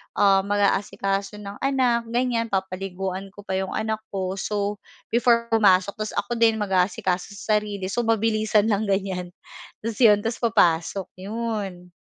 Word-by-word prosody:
um, 195 -1 +4
mag-aasikaso 200 0 0
ng 200 0 -8
anak, 255 -4 +1
ganiyan, 235 -1 0
papaliguan 190 0 -3
ko 205 - -11
pa 190 - -2
yung 190 0 -3
anak 220 0 -1
ko. 190 0 -3
So, 205 0 -2 0.3
before 235 0 +3
pumasok 200 -3 +4
tapos 215 0 -4
ako 240 -1 -2
din 225 -1 +4
mag-aasikaso 185 -1 0
sa 210 +1 +2
sarili. 200 -2 -5
So, 240 - 0
mabilisan 220 -1 +2
lang, 205 +1 0
ganiyan. 190 -2 -1 0.5
Tapos 225 -1 -4
'yon, 210 -5 +6
tapos 225 +1 -2
papasok, 175 0 +2
'yon. 200 -4 -4
205 Hz, 145 wpm, -24 LUFS, 190-225 Hz, 0.5 s, yon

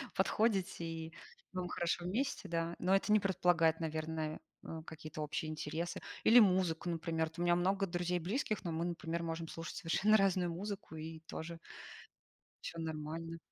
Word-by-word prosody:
подходите, 195 -3 +2
и 165 0 -5 0.4
вам 185 -1 -2
хорошо 175 0 0
вместе, 245 +8 -1
да, 170 0 -1
но 185 +2 +2
это 195 +2 +3
не 215 - +7
предполагает, 175 -4 +3
наверное, 155 -1 -2 0.2
э, 160 0 -6
какие-то 155 -1 -7
общие 150 +1 -2
интересы. 155 +2 -3 0.2
Или 240 +2 +9
музыку, 180 -5 +3
например. 165 -1 0
Вот 165 +2 -11
у - - 0
меня 175 0 +5
много 195 +2 +2
друзей 175 0 0
близких, 215 - -1
но 170 - -2
мы, 165 +2 -1
например, 170 -1 -2
можем 165 0 -3
слушать 165 +1 -6
совершенно 200 +4 +4
разную 185 -3 +3
музыку, 195 0 -5
и 160 +1 -6
тоже 165 +1 -6 1.0
Все 165 - -5
нормально. 160 +1 -4
170 Hz, 160 wpm, -35 LUFS, 160-185 Hz, 1.0 s, Или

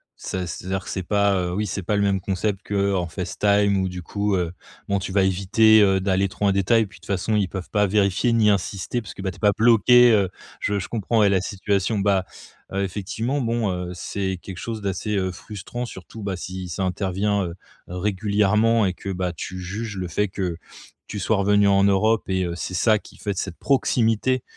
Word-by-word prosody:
c'est - - -5
à 90 - -3
c'est-à-dire 95 +2 -4
que - - -9
c'est 95 - -2
pas, 100 +1 +2
heu, 90 0 -2
oui, 105 - 0
c'est 100 0 -3
pas 105 +5 0
le 100 - +2
même 100 -1 +1
concept 95 +1 -2
qu'en 100 -3 0
FaceTime, 100 +3 +1
où 95 -1 0
du 90 -1 -7
coup, 100 +2 -1
heu, 90 -1 -1 0.3
bon, 100 0 +1
tu 95 - -5
vas 95 -1 +3
éviter, 105 +4 +4
heu, 95 -1 +4
d'aller 95 0 +1
trop 105 - -3
en 100 - +4
détail, 105 +4 +3
puis 95 - -15
de - - -36
toute 95 - -15
façon, 100 +3 0
ils 100 -3 +2
peuvent 95 -2 -6
pas 105 -1 +3
vérifier, 100 +3 +2
ni 110 -2 +4
insister, 100 +4 -2
parce 110 - -10
que, 95 - -8
bah, 95 - -1
tu - - -14
es - - -17
pas 105 -2 +4
bloquée. 120 +2 +6
Heu, 100 -4 +3 0.3
je 105 - -1
je - - -5
comprends 115 0 0
ouais 105 -2 +5
la 95 -2 +2
situation. 100 +1 -1
Bah, 95 -2 +2 0.5
heu, 100 - 0
effectivement 110 +8 -2
bon, 115 -3 0
heu, 90 0 -4
c'est 95 +1 -3
quelque 95 -3 -8
chose 110 -2 -5
d'assez, 100 +2 -2
heu, 95 -1 0
frustrant. 110 +6 -7
Surtout, 95 +3 -10
bah, 95 -2 -2
si 90 0 -6
ça 90 +3 -3
intervient, 95 +2 0
heu, 85 0 -6 0.3
régulièrement 105 +4 +2
et 95 - 0
que 100 - -8
bah, 90 -1 -2
tu 90 +3 -6
juges 100 +3 -5
le 90 - -3
fait 105 +5 0
que, 90 -3 -3 0.5
tu 105 - -5
sois 110 +3 +1
revenue 100 +1 +3
en 100 0 +4
Europe 105 +3 +3
et 95 -1 +1
heu, 85 -1 -3
c'est 90 - -5
ça 110 +4 +3
qui - - -14
fait 100 - -3
de 95 - -12
cette 95 -4 -4
proximité, 130 -2 +1
100 Hz, 225 wpm, -23 LUFS, 95-105 Hz, 0.5 s, bloquée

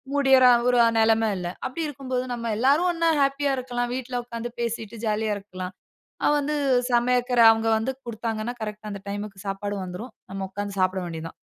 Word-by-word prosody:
முடியற 270 -2 +5 0.2
ஒரு 245 - +4 0.2
நெலம 225 0 +3
இல்ல. 180 - -4 0.2
அப்படி 300 +6 -4
இருக்கும்போது 260 -3 -3
நம்ம 235 -2 -3
எல்லாரும் 285 +9 +3
ஒன்னா 335 -1 +1
ஹேப்பியா 275 0 +1
இருக்கலாம். 245 -1 -2
வீட்ல 250 -1 -3
உட்கார்ந்து 235 0 -5
பேசிட்டு 230 -1 -3
ஜாலியா 215 0 0
இருக்கலாம். 185 -2 -7 0.5
அது - - +4
வந்து 295 +1 -1 0.4
சமைக்கிற 245 0 +2
அவங்க 225 0 0
வந்து 225 +4 -1
குடுத்தாங்கன்னா 225 0 -3
கரெக்ட்டா 210 0 -5
அந்த 200 -1 -6
டைம்க்கு 205 -1 -6
சாப்பாடு 205 +1 -3
வந்துரும். 185 +7 -7 0.2
நம்ம 195 0 -4
உட்கார்ந்து 200 0 -5
சாப்பிட 185 0 +1
வேண்டியது 165 -1 -6
தான். - - -19
230 Hz, 165 wpm, -25 LUFS, 205-255 Hz, 0.5 s, முடியற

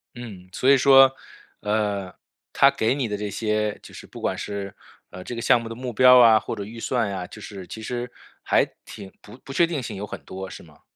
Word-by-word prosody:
嗯。 100 -7 -10
所 130 +8 +1
以 140 - +7
说， 135 0 +7 0.5
呃， 105 -3 -1 0.4
他 140 - +6
给 125 -3 0
你 130 -5 -1
的 105 -1 -3
这 105 0 -4
些 105 -1 -1
就 - - -14
是 - - -10
不 - - -11
管 - - -2
是， 100 -1 -6 0.3
呃 90 0 -10
这 120 - -6
个 115 - -5
项 125 -1 +4
目 115 - -7
的 115 - -7
目 125 -1 -6
标 125 +2 +7
啊 110 -2 +7
或 115 - -5
者 100 - -5
预 115 +3 -10
算 115 -4 -1
啊， 90 -2 -5
就 110 - -12
是 100 -4 -9
其 110 - -8
实 120 +2 -5 0.3
还 - - +3 0.2
挺 95 -2 -10
不 - - -14
不 135 - -10
确 170 - +4
定 165 -5 -3
性 115 - -6
有 100 +2 -5
很 - - -8
多 95 0 -8
是 - - -10
吗？ 75 -2 -20
110 Hz, 250 characters per minute, -24 LUFS, 100-125 Hz, 0.5 s, 以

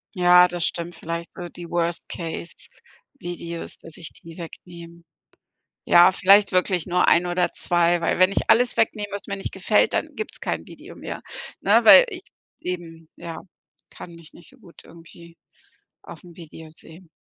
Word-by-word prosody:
Ja, 180 0 +6
das 175 -2 -2
stimmt 170 0 -3
vielleicht 170 +1 -6
so 175 -2 -8
die 170 -1 -11
worst 170 0 -1
case 165 -2 -6 0.7
Videos, 170 -1 -7
dass 165 -2 -12
ich 165 - -7
die 165 +1 -12
wegnehme. 170 0 -11 0.8
Ja, 175 +2 +6
vielleicht 200 +2 +4
wirklich 185 -2 0
nur 180 0 +1
1 175 +1 +4
oder 175 0 0
2, 175 0 +1
weil 165 - -1
wenn 185 +1 +5
ich - - -2
alles 245 +1 +4
wegnehme, 210 -2 0
was 200 0 -7
mir 200 - -4
nicht 195 - -5
gefällt, - - +1
dann - - -1
gibt's 435 - -6
kein - - -4
Video - - -13
mehr, - - -8 0.4
ne, - - +3
weil - - +9
ich 370 -4 -8 0.4
eben, 165 -3 -7
ja. 165 -1 -8 0.5
Kann 170 - -11
mich 165 -2 -16
nicht 175 - -11
so 270 - -21
gut 175 -7 -17
irgendwie 170 0 -16 0.6
auf'm 175 -2 -14
Video 160 -1 -12
sehen. 165 +2 -15
175 Hz, 165 wpm, -23 LUFS, 170-185 Hz, 0.8 s, weil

